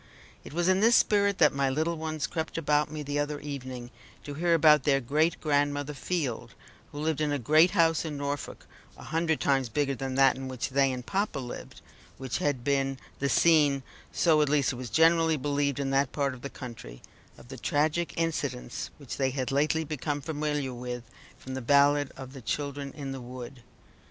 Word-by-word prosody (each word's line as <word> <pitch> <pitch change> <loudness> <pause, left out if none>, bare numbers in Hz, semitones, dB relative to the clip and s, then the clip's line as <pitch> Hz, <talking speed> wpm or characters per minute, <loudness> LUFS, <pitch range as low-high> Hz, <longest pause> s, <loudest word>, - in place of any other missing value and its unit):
It - - -10
was 170 +3 0
in 185 0 +4
this 230 +3 +5
spirit 200 -1 +3
that 150 -3 +5
my 140 -1 +1
little 160 +5 0
ones 155 -2 -3
crept 160 -1 -4
about 150 -2 +1
me 155 -1 -5
the 145 0 -2
other 145 0 -2
evening 130 -4 -7 0.3
to 145 - -6
hear 170 +3 +2
about 150 -2 +6
their 135 0 +3
great 150 +6 +1
grandmother 145 -1 0
Field, 140 -4 -3 0.4
who 145 - -10
lived 155 -1 -1
in 150 -1 +1
a 145 - +1
great 155 +7 +5
house 165 -1 +3
in 155 -3 -5
Norfolk 140 0 -4 0.3
(a - - -11
hundred 160 +1 0
times 135 -3 +1
bigger 140 +4 0
than 135 0 -4
that 135 -1 +5
in 135 0 -6
which 130 -1 -4
they 135 0 +2
and 125 -1 -5
papa 200 -4 -1
lived) 125 -3 -7 0.4
which 130 -5 -3
had 145 -5 -1
been 135 -1 0 0.2
the 140 - 0
scene 145 -5 +4 0.3
so 160 -3 +3
at 150 - +2
least 140 -3 +2
it - - -7
was 125 -2 -6
generally 165 +2 +4
believed 140 0 -1
in 135 -1 -1
that 135 0 +2
part 140 -2 -1
of 125 - -11
the 140 - -5
country 115 - -10 0.3
of 120 - -16
the 135 - -8
tragic 155 +6 0
incidents 140 -7 -2
which 140 -4 -7
they 135 -1 +1
had 130 -1 -3
lately 155 +3 +1
become 150 -1 -3
familiar 150 -2 -2
with 125 0 -5 0.3
from 130 - -8
the 130 - -4
ballad 145 +2 +4
of 130 -1 -9
the 135 - -9
Children 140 +2 -3
in 140 -3 -6
the 135 -1 -6
Wood. 125 +1 -9
145 Hz, 200 wpm, -28 LUFS, 135-155 Hz, 0.4 s, about